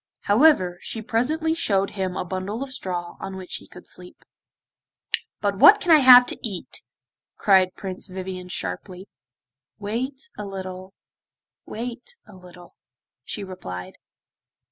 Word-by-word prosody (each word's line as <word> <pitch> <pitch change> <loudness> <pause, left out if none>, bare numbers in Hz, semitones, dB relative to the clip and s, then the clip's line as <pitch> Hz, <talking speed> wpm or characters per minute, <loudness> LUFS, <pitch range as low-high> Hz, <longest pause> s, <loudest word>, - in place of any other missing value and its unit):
However, 205 - +4
she 225 - -5
presently 295 +8 0
showed 200 - +1
him 190 -2 -3
a - - -2
bundle 190 +7 -4
of 275 - -8
straw 175 -6 -5
on 195 0 -6
which 185 -1 -6
he - - -15
could 180 - -14
sleep. 180 0 -9 1.2
'But 200 -1 -1
what 415 +1 +9
can 350 - +1
I 315 - +9
have 250 -2 +9
to - - -5
eat?' 195 -6 -6 0.6
cried 190 -2 +4
Prince 190 -2 -6
Vivien 185 -1 -6
sharply. 185 +1 -5 0.7
'Wait 250 - -4
a - - -6
little, 190 -1 -7 0.7
wait 245 - -6
a 210 - -15
little,' 180 -1 -15 0.5
she 210 - -5
replied. 90 - -8
195 Hz, 135 wpm, -24 LUFS, 185-240 Hz, 1.2 s, what